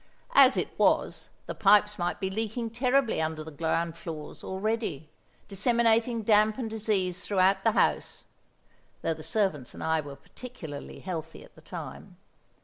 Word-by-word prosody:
As 270 -1 +7
it - - -2
was, - - +2 0.2
the - - -4
pipes 210 0 +4
might 175 0 -1
be 190 -1 -2
leaking 225 +2 -3
terribly 250 -2 +2
under 160 0 -2
the 160 - -9
ground 165 +2 -1
floors 160 -3 -8
already, 190 - -3 0.4
disseminating 230 +2 +2
damp 215 0 +4
and 250 -4 -3
disease 200 -4 -1
throughout 190 -1 +3
the 225 +1 +2
house - - 0 0.8
(though 165 - +1
the 155 - -10
servants 160 - -1
and - - -7
I 160 0 +1
were 145 -1 -9
particularly 160 - -9
healthy 165 -4 -6
at - - -18
the - - -17
time). - - -9
195 Hz, 150 wpm, -28 LUFS, 160-225 Hz, 0.8 s, As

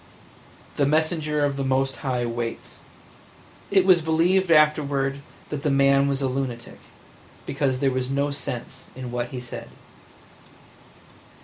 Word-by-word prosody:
The 140 - +3
messenger 155 -1 +1
of 140 -1 -2
the 135 - -1
Most 135 0 0
High 125 -3 -2
waits!" 115 0 -5 0.9
It 190 -2 +4
was 185 -3 +6
believed 170 +4 +2
afterward 145 -3 +3 0.3
that 150 -2 -4
the 150 - 0
man 140 0 +4
was 140 0 -1
a - - +2
lunatic, 125 -3 -4 0.7
because 135 -3 -1
there 135 -1 +3
was 130 0 -2
no 140 +1 0
sense 135 -1 -6
in 130 -2 -6
what 120 0 -2
he 125 +1 -6
said. 125 -1 -8
140 Hz, 135 wpm, -24 LUFS, 130-150 Hz, 0.9 s, was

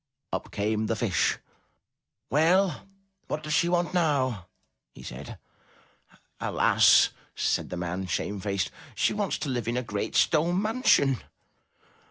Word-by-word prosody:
Up - - -3
came 110 +1 -1
the 115 - 0
Fish. 110 -4 +1 0.9
"Well, 175 +5 +2 0.4
what 155 - -4
does 150 0 -3
she 170 +1 +3
want 175 0 0
now?" 130 - 0 0.5
he - - -12
said. 65 +3 -8 1.0
"Alas!" - - +4 0.2
said - - 0
the 90 - -5
man, 90 +2 -3
shamefaced. 100 +1 -2 0.2
"She - - +1
wants 205 -2 -1
to 145 - -4
live 120 -4 -2
in 120 +1 -1
a 125 - -1
great 105 -3 -4
stone 170 +3 +3
mansion." 210 - +2
130 Hz, 130 wpm, -27 LUFS, 100-170 Hz, 1.0 s, Alas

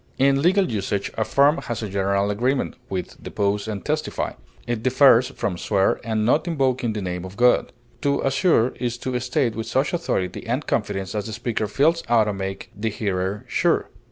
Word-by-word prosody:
In 135 +1 +3
legal 185 +2 +3
usage, 100 -1 -2
affirm 140 +8 +3
has 115 -7 -4
a - - -2
general 100 +1 0
agreement 125 +6 0
with 95 -2 -5
depose 100 +1 -1
and 105 -3 -5
testify; 155 +1 -2 0.3
it 120 -2 -2
differs 130 -1 +5
from 100 -9 -3
swear 100 -2 +2
in 110 -1 0
not 150 +8 +2
invoking 130 -7 0
the 105 -2 -4
name 90 -1 -3
of 95 +2 -9
God. 125 0 +3 0.3
To 140 0 +1
assure 135 -3 +3
is 120 -1 -2
to 125 0 -2
state 125 -1 0
with 115 0 -4
such 130 +7 0
authority 130 - -2
and - - -1
confidence 95 -1 -2
as 105 0 -3
the 110 - -6
speaker 115 -2 -2
feels 160 - +2
ought 115 -2 +5
to 105 -1 -2
make 95 0 -5
the 110 +3 -2
hearer 100 -1 -2
sure. - - +1
115 Hz, 185 wpm, -23 LUFS, 100-135 Hz, 0.3 s, differs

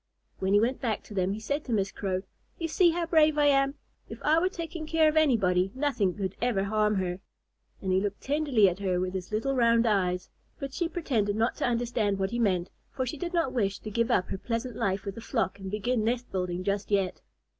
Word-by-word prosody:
When 190 +1 0
he 205 - +6
went 245 +4 0
back 225 -5 -1
to - - -11
them, 190 0 0
he 210 - -5
said 285 +7 -2
to 250 - -5
Miss 200 -3 +1
Crow, 185 -1 -2 0.3
"You 330 - -2
see 345 +2 +4
how 335 +1 0
brave 310 -2 +4
I 295 - +4
am. 275 0 +3 0.3
If - - -8
I 315 +2 +4
were 365 +2 +2
taking 335 -3 -6
care 320 0 +4
of 310 - +1
anybody, 195 -12 +3
nothing 260 -10 0
could 195 -2 -3
ever 235 -5 +1
harm 210 +1 +1
her." 185 -1 -2 0.6
And 190 - 0
he 185 +1 +3
looked 205 0 -3
tenderly 280 -7 +3
at 180 +1 -1
her 185 -3 0
with 185 0 -2
his 185 0 -5
little 225 +6 0
round 235 -1 +4
eyes. 180 -4 0 0.3
But 275 -1 -5
she 340 +1 -1
pretended 235 - 0
not 225 +2 +1
to - - 0
understand 230 -4 0
what 190 +1 -1
he 240 - -2
meant, 185 -5 +1 0.2
for 260 - -3
she 280 +5 -4
did 345 -1 -3
not 330 -7 +1
wish 200 -5 0
to 215 - -8
give 230 +3 +1
up 185 -6 +2
her 190 - -4
pleasant 230 +2 -3
life 195 0 -1
with 200 - -3
the 230 - -9
flock 225 -4 -1
and 190 -1 -6
begin 220 +3 0
nest 240 +2 -1
building 180 -1 -2
just 200 +1 -1
yet. 195 -3 0
220 Hz, 235 wpm, -28 LUFS, 195-275 Hz, 0.6 s, he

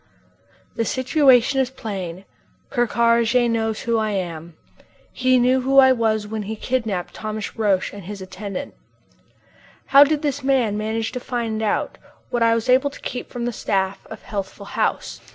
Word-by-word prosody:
The 230 - +1
situation 260 +1 +3
is 260 -2 +1
plain. 195 -7 -6 0.5
Ker 240 -3 +1
Karraje 235 +2 +3
knows 225 -1 -1
who 230 -1 0
I 215 0 0
am. 170 -4 -5 0.6
He 255 0 +3
knew 255 +1 +3
who 270 +2 +1
I 265 -1 +8
was 220 -4 +1
when 215 +1 -4
he 210 +2 -5
kidnapped 220 -6 -2
Thomas 215 -1 -5
Roch 205 -4 0
and 200 -3 -9
his 205 +1 -7
attendant. 190 +1 -6 1.1
How 275 +1 +8
did 295 +1 0
this 285 -1 -1
man 260 -6 +1
manage 220 +1 -2
to 250 - -4
find 230 -3 -3
out 215 -2 -1 0.3
what 240 -2 -1
I 230 0 +4
was 230 +2 -2
able 260 +3 +4
to 280 - -13
keep 250 - -5
from 240 -1 -4
the 240 - -2
staff 195 -2 -2
of - - -10
Healthful 200 0 -6
House? - - -1
230 Hz, 170 wpm, -22 LUFS, 205-255 Hz, 1.1 s, I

